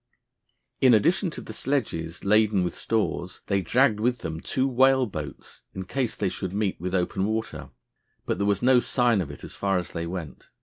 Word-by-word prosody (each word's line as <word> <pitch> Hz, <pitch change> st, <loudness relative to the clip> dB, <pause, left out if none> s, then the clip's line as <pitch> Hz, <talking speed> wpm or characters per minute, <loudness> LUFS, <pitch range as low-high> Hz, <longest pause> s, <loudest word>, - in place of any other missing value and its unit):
In 130 Hz, -3 st, +6 dB
addition 175 Hz, -, +2 dB
to -, -, -8 dB
the 110 Hz, -, -9 dB
sledges 105 Hz, -, -2 dB
laden 105 Hz, -1 st, +3 dB
with 90 Hz, -, -2 dB
stores, 105 Hz, -5 st, -2 dB
they 100 Hz, -1 st, +1 dB
dragged 110 Hz, -, +3 dB
with 120 Hz, +2 st, 0 dB
them 80 Hz, 0 st, -4 dB
two 130 Hz, +9 st, 0 dB
whale 130 Hz, 0 st, +4 dB
boats 75 Hz, -, -8 dB
in 95 Hz, 0 st, -5 dB
case 125 Hz, +3 st, -2 dB
they 100 Hz, -, -1 dB
should 95 Hz, 0 st, -4 dB
meet 100 Hz, -4 st, -1 dB
with 90 Hz, +1 st, -2 dB
open 95 Hz, +1 st, 0 dB
water. 110 Hz, +1 st, -3 dB, 0.6 s
But -, -, -2 dB
there 100 Hz, -, +1 dB
was 100 Hz, +3 st, +1 dB
no 125 Hz, 0 st, +6 dB
sign 120 Hz, -4 st, +2 dB
of 80 Hz, -, -5 dB
it 70 Hz, -, -10 dB
as -, -, -7 dB
far 100 Hz, -1 st, 0 dB
as 90 Hz, -, -4 dB
they 85 Hz, -1 st, -4 dB
went. 85 Hz, -4 st, -7 dB
105 Hz, 200 wpm, -26 LUFS, 90-120 Hz, 0.6 s, In